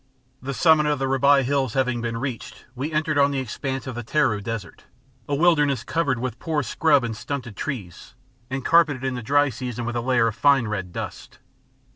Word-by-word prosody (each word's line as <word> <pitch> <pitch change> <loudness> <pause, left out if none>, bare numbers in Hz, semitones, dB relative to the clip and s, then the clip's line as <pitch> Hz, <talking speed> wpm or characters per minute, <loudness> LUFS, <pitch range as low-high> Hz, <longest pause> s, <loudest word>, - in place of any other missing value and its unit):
The 135 +1 -4
summit 155 -1 +4
of 150 -1 +1
the 135 - -1
Rabai 135 +1 +4
Hills 135 -3 0
having 130 -3 0
been 115 -1 -3
reached, 125 -1 -6
we 135 +5 -4
entered 155 -1 0
on 140 0 +5
the 140 - -2
expanse 130 +1 -4
of 130 - -5
the 120 0 -5
Taru 115 -4 +1
Desert, 115 -3 -6 0.4
a 145 - +1
wilderness 145 -6 +3
covered 160 -6 0
with 125 -1 -4
poor 155 -3 -1
scrub 145 +1 +2
and 115 -2 -3
stunted 125 -3 -5
trees, 105 - -6 0.3
and 135 0 -4
carpeted 160 -6 +3
in 130 -1 -1
the 125 - -4
dry 145 +5 +3
season 125 -1 -5
with 120 0 -3
a 120 - 0
layer 120 -1 +2
of 110 - -1
fine 140 -5 +3
red 95 -4 -4
dust. - - -7
130 Hz, 200 wpm, -23 LUFS, 120-145 Hz, 0.4 s, on